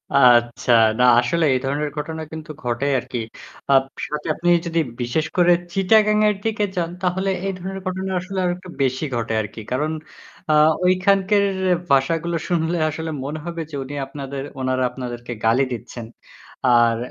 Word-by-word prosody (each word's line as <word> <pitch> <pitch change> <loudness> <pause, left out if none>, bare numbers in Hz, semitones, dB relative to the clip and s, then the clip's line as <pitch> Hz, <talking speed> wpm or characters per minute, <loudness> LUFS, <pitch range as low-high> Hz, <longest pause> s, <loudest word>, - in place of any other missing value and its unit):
আচ্ছা, 120 -2 +4 0.3
না - - +4 0.2
আসলে 160 +7 +1
এ - - +3
ধরনের 145 +2 -1
ঘটনা 160 +2 -4
কিন্তু 160 0 -7
ঘটে 125 +3 -1
আরকি। 125 - -6 0.5
আ - - +6 0.3
সাথে 150 0 -5
আপনি 175 +1 0 0.2
যদি 170 0 0 0.2
বিশেষ 120 +6 0
করে 175 0 +5 0.2
'চিটাগাং' 210 +2 +4
এর 210 - 0
দিকে 220 -1 0
যান 170 -2 -1
তাহলে 190 +2 0 0.2
এই 195 - -1
ধরনের 190 +2 -6
ঘটনা 190 +1 -3
আসলে 190 +2 -7
আরেকটু 180 +1 -3
বেশি 130 +3 0
ঘটে 115 -1 -2
আরকি। 110 +1 -8
কারণ 150 +5 0 0.6
আ - - +4 0.3
ঐখানকার 195 +2 +3 0.5
ভাষাগুলো 165 +5 +1
শুনলে 170 -1 0
আসলে 160 +1 -4
মনে 150 +3 -4
হবে 170 -1 -4
যে - - -6
উনি 135 +2 -8
আপনাদের 135 0 -6 0.2
ওনারা 130 0 0
আপনাদেরকে 120 -2 -6
গালি 115 +4 +4
দিচ্ছেন। 120 0 -6 0.6
আর 120 -2 +4
155 Hz, 155 wpm, -21 LUFS, 130-180 Hz, 0.6 s, আ